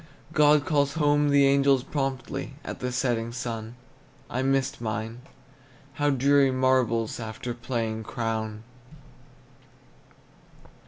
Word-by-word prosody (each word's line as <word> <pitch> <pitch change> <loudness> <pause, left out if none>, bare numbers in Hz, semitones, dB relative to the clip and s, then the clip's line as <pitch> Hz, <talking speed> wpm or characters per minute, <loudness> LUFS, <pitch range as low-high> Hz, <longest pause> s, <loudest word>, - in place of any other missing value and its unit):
God 150 -2 +5
calls 145 -2 +1
home 145 -1 +3
the 140 -1 +5
angels 135 -1 +4
promptly 135 -1 -3
At - - -6
the 125 0 -3
setting 120 -3 -1
sun; 115 -1 -5 0.6
I 125 - -1
missed 135 -2 0
mine. 110 +2 -4 0.7
How 145 +2 +1
dreary 140 0 +4
marbles, 130 -4 +1
After 110 +2 -5
playing 115 -2 -3
Crown! 110 -2 -3
130 Hz, 105 wpm, -26 LUFS, 115-140 Hz, 0.7 s, God